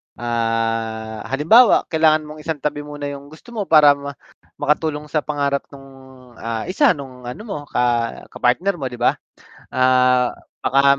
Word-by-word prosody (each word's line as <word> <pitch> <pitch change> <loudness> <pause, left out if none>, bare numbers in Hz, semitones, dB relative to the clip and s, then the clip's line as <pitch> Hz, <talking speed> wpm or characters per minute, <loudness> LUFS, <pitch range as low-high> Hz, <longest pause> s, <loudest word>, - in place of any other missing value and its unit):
ah, 115 -1 -2
halimbawa 160 - +5
kailangan 155 -1 +3
mong 150 0 -10
isang 160 +1 -3
tabi 150 0 -1
muna 145 -1 -6
yung 140 0 -9
gusto 160 +11 -15
mo 210 -4 -4
para 150 -2 +7
ma 140 0 -4 0.4
makatulong 150 0 0
sa 155 - +2
pangarap 140 -2 -2
nung, 135 -1 -14 0.5
ah, 115 -1 -3
isa 230 - +3
nung 130 -3 -10
ano 125 - -7
mo 205 -8 -5
ka 120 -1 0
kapartner 175 +9 0
mo 135 - -2
'di 120 -1 -9
ba? - - +2 0.5
Ah, 125 -1 +3 0.2
baka 140 +1 +3
140 Hz, 155 wpm, -20 LUFS, 125-155 Hz, 0.5 s, para